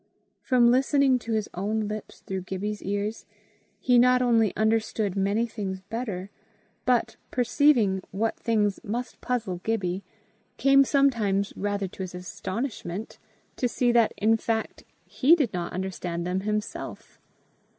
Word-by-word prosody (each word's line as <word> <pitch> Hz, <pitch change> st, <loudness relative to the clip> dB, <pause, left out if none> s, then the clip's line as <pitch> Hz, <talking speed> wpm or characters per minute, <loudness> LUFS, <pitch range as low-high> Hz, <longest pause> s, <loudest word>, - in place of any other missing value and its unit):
From 245 Hz, -3 st, +4 dB
listening 270 Hz, 0 st, +3 dB
to 230 Hz, -1 st, -4 dB
his 215 Hz, -1 st, 0 dB
own 210 Hz, +4 st, -1 dB
lips 215 Hz, 0 st, -7 dB
through 190 Hz, -1 st, -4 dB
Gibbie's 200 Hz, +3 st, -4 dB
ears, 205 Hz, +3 st, -3 dB, 0.5 s
he 250 Hz, -1 st, +4 dB
not 250 Hz, +1 st, +5 dB
only 230 Hz, -5 st, +3 dB
understood 220 Hz, -2 st, 0 dB
many 200 Hz, +4 st, +1 dB
things 195 Hz, -5 st, -5 dB
better, 210 Hz, -5 st, -4 dB, 0.5 s
but, 250 Hz, -2 st, +1 dB
perceiving 245 Hz, -6 st, +3 dB
what 220 Hz, +4 st, -1 dB
things 210 Hz, -4 st, 0 dB
must 240 Hz, +4 st, -4 dB
puzzle 220 Hz, -8 st, -2 dB
Gibbie, 195 Hz, -4 st, -1 dB, 0.6 s
came 275 Hz, 0 st, +6 dB
sometimes, 230 Hz, -9 st, +2 dB
rather 205 Hz, 0 st, -2 dB
to 190 Hz, -, -10 dB
his 185 Hz, -1 st, -5 dB
astonishment, 190 Hz, +2 st, -5 dB, 0.4 s
to 250 Hz, -, +1 dB
see 245 Hz, 0 st, +1 dB
that 235 Hz, -2 st, +4 dB
in 225 Hz, +2 st, +3 dB
fact 225 Hz, 0 st, -3 dB, 0.2 s
he 295 Hz, +6 st, +4 dB
did 285 Hz, -10 st, 0 dB
not 175 Hz, -1 st, -3 dB
understand 180 Hz, -2 st, -4 dB
them 180 Hz, +1 st, -1 dB
himself. 210 Hz, +2 st, -4 dB
215 Hz, 135 wpm, -26 LUFS, 195-240 Hz, 0.6 s, came